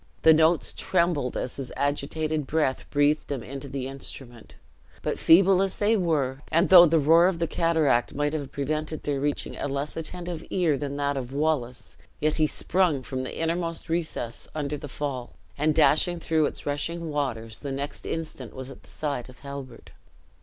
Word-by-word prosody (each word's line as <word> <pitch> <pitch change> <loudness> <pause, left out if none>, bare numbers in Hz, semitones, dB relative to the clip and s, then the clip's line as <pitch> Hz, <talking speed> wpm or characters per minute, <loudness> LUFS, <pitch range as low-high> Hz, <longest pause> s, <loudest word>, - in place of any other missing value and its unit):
The 160 - +8
notes 160 +1 +3
trembled 170 -8 0
as 125 - -4
his 135 -2 -6
agitated 150 +1 -1
breath 145 -4 0
breathed 145 +1 +2
them 135 -5 -4
into 140 +1 -7
the 130 -1 -4
instrument; 130 -3 -9 0.5
but - - -2
feeble 185 +2 +6
as 195 -1 0
they 210 +2 +3
were, 145 -8 0
and 170 +4 +2
though 175 -2 +10
the 165 +1 +3
roar 165 +4 +6
of 185 -2 0
the 165 - 0
cataract 160 -8 +1
might 145 +1 0
have 145 -4 -4
prevented 155 +2 -3
their 145 -2 -1
reaching 145 +1 -2
a - - -2
less 140 +2 -3
attentive 170 +1 -5
era 170 -6 +2
than 140 0 -4
that 140 -1 0
of 130 -1 -5
Wallace, 140 -4 -2 0.2
yet 155 +1 +1
he 155 -1 +3
sprung 165 -5 +1
from 130 0 -4
the 130 - -6
innermost 165 0 -2
recess 160 -8 -3
under 150 -1 -2
the 145 - -7
fall, 130 -4 -4 0.2
and 150 +1 +1
dashing 160 +3 +4
through 160 -2 +2
its - - -8
rushing 160 +3 -2
waters, 115 -7 -3
the 140 - -5
next 140 +2 -5
instant 155 -7 -5
was 130 0 -7
at - - -12
the - - -17
side 140 -5 -4
of 125 - -15
Halbert. 140 -4 -9
145 Hz, 180 wpm, -26 LUFS, 135-165 Hz, 0.5 s, though